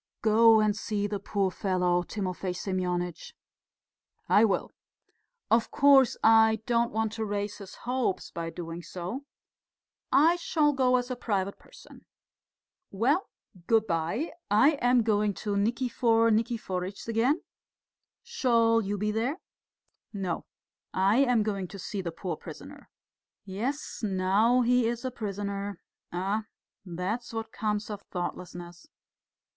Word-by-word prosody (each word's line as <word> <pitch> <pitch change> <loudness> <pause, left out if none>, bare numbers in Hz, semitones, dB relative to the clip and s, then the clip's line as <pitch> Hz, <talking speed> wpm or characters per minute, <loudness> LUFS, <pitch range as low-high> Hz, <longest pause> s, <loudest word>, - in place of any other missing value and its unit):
"Go 225 +1 +6
and 215 -1 +2
see 205 -1 -2
the 205 -1 -2
poor 200 -1 -1
fellow, 180 -2 +1
Timofey 185 -1 -4
Semyonitch." 180 -2 -3 0.9
"I 210 - +5
will. 205 -4 +1 0.8
Of 230 +1 +3
course, 275 -3 +5
I 220 0 +5
don't 235 -1 +1
want 220 0 -1
to 225 - -3
raise 205 0 -3
his 195 -2 -10
hopes 245 -6 -1
by 165 0 -4
doing 165 0 -7
so. 185 +11 -6 0.9
I 330 +5 +5
shall 305 -4 +1
go 255 -2 +3
as 250 0 -1
a - - -1
private 200 -5 -2
person.... - - -16 0.8
Well, 265 - +1 0.4
good 225 -1 +3
bye, 170 - -1 0.2
I 220 +9 +5
am 245 -1 +4
going 210 -2 +1
to 205 -1 -3
Nikifor 230 +1 +2
Nikiforitch's 205 -5 -2
again: 235 +8 +1 0.8
shall 230 - +2
you 205 0 -2
be 210 +2 -1
there?" 235 +8 -1 0.7
"No, 190 -5 -4 0.5
I 195 +4 +3
am 250 -5 +3
going 200 -3 -2
to 195 - -10
see 195 +1 -4
the 170 -2 -4
poor 175 +2 -4
prisoner." - - -11 0.6
"Yes, 235 +10 -4
now 205 +4 +2
he 245 -1 +3
is 235 +2 -3
a 255 - -2
prisoner!... 200 -3 -4 0.3
Ah, 195 +5 -1 0.4
that's 195 +7 -4
what 225 0 -4
comes 210 0 -2
of 205 -1 -6
thoughtlessness!" 175 -1 -6
210 Hz, 130 wpm, -28 LUFS, 190-235 Hz, 0.9 s, Go